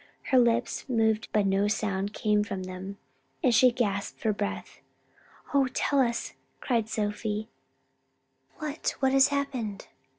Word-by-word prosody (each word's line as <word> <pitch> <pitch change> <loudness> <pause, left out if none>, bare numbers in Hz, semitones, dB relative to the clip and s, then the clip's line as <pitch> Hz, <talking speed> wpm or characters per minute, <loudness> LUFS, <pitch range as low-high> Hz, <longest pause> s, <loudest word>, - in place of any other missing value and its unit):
Her 260 - +6
lips 240 +2 +1
moved 220 -3 +2
but 210 -2 +2
no 195 +1 +2
sound 200 -1 -2
same 210 -1 +2
from 195 -2 -5
them, 185 +2 -7 0.5
and 255 -4 +4
she 250 +3 +6
gasped 205 -5 -2
for 220 -2 +1
breath. 205 0 -4 0.7
"Oh 275 -2 +4
tell 280 - +2
us!" 235 -3 0 0.3
cried 230 -4 0
Sophie, 210 0 -2 1.1
"what, 305 0 -3
what 265 -1 +2
has 270 0 +6
happened?" 260 -8 -3
220 Hz, 135 wpm, -28 LUFS, 205-255 Hz, 1.1 s, Her